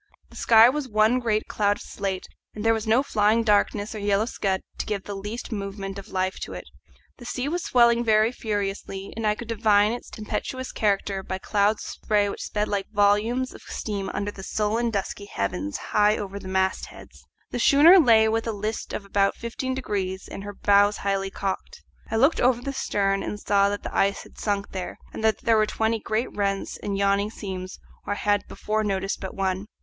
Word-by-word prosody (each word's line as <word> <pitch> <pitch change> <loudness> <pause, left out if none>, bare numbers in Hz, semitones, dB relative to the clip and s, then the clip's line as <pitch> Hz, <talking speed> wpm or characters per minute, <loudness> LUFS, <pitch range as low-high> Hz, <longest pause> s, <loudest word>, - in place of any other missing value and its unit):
The - - -15
sky 225 0 +7
was 280 +2 -1
one 215 +3 +3
great 215 -3 0
cloud 205 -1 +1
of - - -10
slate, 195 -2 -4 0.3
and 215 +1 -5
there 225 - +5
was 220 0 -3
no 235 +5 +4
flying 220 -2 +2
darkness 205 0 +1
or 215 - -5
yellow 205 +1 +1
scud 195 -5 -1 0.2
to - - -3
give 205 -3 -2
the 205 - -6
least 205 +6 -6
movement 195 -1 -5
of 195 - -10
life 185 0 -2
to - - -6
it. - - -6 0.5
The 240 - -12
sea 250 +2 -3
was 345 +3 -2
swelling 235 -1 +4
very 220 0 +4
furiously, 200 -3 -4
and 225 -1 -1
I 210 - +2
could 235 - -8
divine 215 -2 +3
its 240 - -6
tempestuous 255 +4 -4
character 200 -2 0
by 190 0 -4
clouds 205 +2 +1
of - - -7
spray 205 -1 +1
which - - -6
sped 210 0 -2
like 200 -1 -2
volumes 215 +5 +2
of - - -12
steam 200 -3 -4
under 205 0 -3
the 195 - -10
sullen 215 +4 0
dusky 200 -1 -3
heavens 100 - -3
high 210 0 +2
over 200 -1 -5
the 190 - -10
mastheads. 190 0 -3 0.3
The - - -3
schooner 320 +7 +7
lay 225 -7 +6
with 225 +1 0
a - - 0
list 215 +2 -4
of 200 - -4
about 200 0 +1
fifteen 260 +3 -4
degrees 190 -7 -3
and 195 - -7
her 205 0 -7
bows 205 +1 +4
high 195 -1 -1
cocked. 195 0 -5 0.3
I 225 - -2
looked 275 +8 +3
over 245 -1 +3
the 275 +3 -4
stern 195 -6 0
and 210 - -4
saw 200 -1 +3
that 205 0 -4
the - - -6
ice 200 +1 +1
had - - -16
sunk 200 -1 -2
there, 185 -2 -5 0.2
and - - -6
that 220 -1 +2
there 230 -1 +3
were 215 0 +3
twenty 225 +1 0
great 220 +3 -2
rents 200 -1 -1
and 200 -1 -3
yawning 200 +1 +2
seams 190 -4 -6 0.3
where 205 - -1
I - - -8
had 205 0 +1
before 215 +1 -2
noticed 195 -1 -1
but 190 - -6
one. 190 +1 -1
210 Hz, 205 wpm, -25 LUFS, 200-225 Hz, 0.5 s, sky